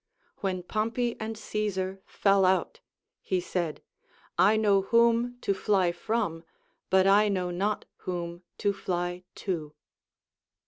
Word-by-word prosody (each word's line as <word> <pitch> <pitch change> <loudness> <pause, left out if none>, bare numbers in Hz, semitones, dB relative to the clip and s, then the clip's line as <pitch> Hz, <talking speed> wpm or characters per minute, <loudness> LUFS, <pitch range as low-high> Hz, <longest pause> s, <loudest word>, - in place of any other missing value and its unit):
When 185 -2 -2
Pompey 230 +5 -1
and 220 0 -4
Caesar 195 -3 -2
fell 195 -1 +3
out, 185 0 +2 0.4
he 185 - 0
said, 175 -3 -3 0.5
I 195 +6 +5
know 205 -3 +4
whom 235 +3 +3
to 200 - +1
fly 190 -2 +2
from, 175 -2 -2 0.5
but 190 0 +5
I 205 +2 +5
know 180 -3 -1
not 200 +4 -1
whom 175 -1 -5 0.2
to 205 -1 +1
fly 175 -2 -3 0.2
to. 160 -6 -3
195 Hz, 125 wpm, -28 LUFS, 180-215 Hz, 0.5 s, I